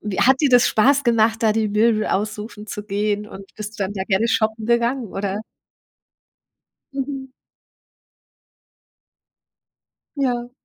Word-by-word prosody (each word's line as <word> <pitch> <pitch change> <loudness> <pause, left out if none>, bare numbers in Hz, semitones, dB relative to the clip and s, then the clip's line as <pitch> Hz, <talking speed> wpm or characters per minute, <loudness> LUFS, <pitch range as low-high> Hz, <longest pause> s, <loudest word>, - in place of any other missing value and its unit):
Wie 210 -3 -4
hat 265 +2 +4
dir 290 - +3
das 245 -1 +5
Spaß 275 +6 +3
gemacht, 225 -1 +2
da 215 -1 +4
die 220 -1 0
Möbel 215 +1 +2
aussuchen 210 +1 -3
zu 210 - -6
gehen, 210 +1 -1
und 195 - -10
bist 215 0 -8
du 195 - 0
dann 200 - -5
sehr 190 -1 -3
gerne 195 +4 +2
shoppen 220 -1 0
gegangen, 235 +1 +1
oder? 195 +1 -3 1.5
Mhm. 270 -1 -4 2.9
Ja. 245 -3 -1
220 Hz, 130 wpm, -21 LUFS, 210-240 Hz, 2.9 s, das